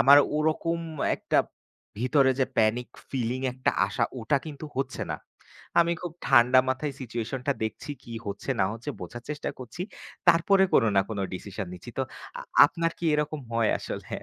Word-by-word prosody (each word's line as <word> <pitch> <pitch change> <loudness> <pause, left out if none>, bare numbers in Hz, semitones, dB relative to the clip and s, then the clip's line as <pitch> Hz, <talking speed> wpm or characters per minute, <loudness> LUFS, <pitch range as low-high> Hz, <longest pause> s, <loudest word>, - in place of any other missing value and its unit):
আমার 140 +2 +9 0.2
ওরকম 160 +2 +1 0.4
একটা - - +1 0.6
ভিতরে 130 +2 +4
যে - - +5
প্যানিক 115 +3 +2 0.2
ফিলিং 125 -1 -1
একটা 130 +1 +1 0.2
আশা 105 - 0 0.2
ওটা 140 +5 +2
কিন্তু 150 0 -7
হচ্ছে 135 -1 -2
না। - - -5 0.6
আমি 170 0 +3
খুব 175 -2 -4
ঠান্ডা 130 0 +7
মাথায় 135 +2 -1
সিচুয়েশন 120 +1 -4
টা - - +5
দেখছি 110 +6 -5
কি 115 - -9
হচ্ছে 100 +6 -4
না - - +5
হচ্ছে 115 +6 -5
বোঝার 120 0 -7
চেষ্টা 150 - -3
করছি। 130 +7 -6 0.5
তারপরে 190 +3 +5
কোনো 115 - +5
না - - +7
কোনো 100 -3 -2
ডিসিশন 100 +1 -5
নিচ্ছি। 90 - -10
তো - - +3 0.4
আ - - -6 0.2
আপনার 165 0 -1
কি - - -6
এরকম 150 0 -1
হয় 115 -1 +3
আসলে? - - -6
130 Hz, 170 wpm, -27 LUFS, 115-150 Hz, 0.6 s, আমার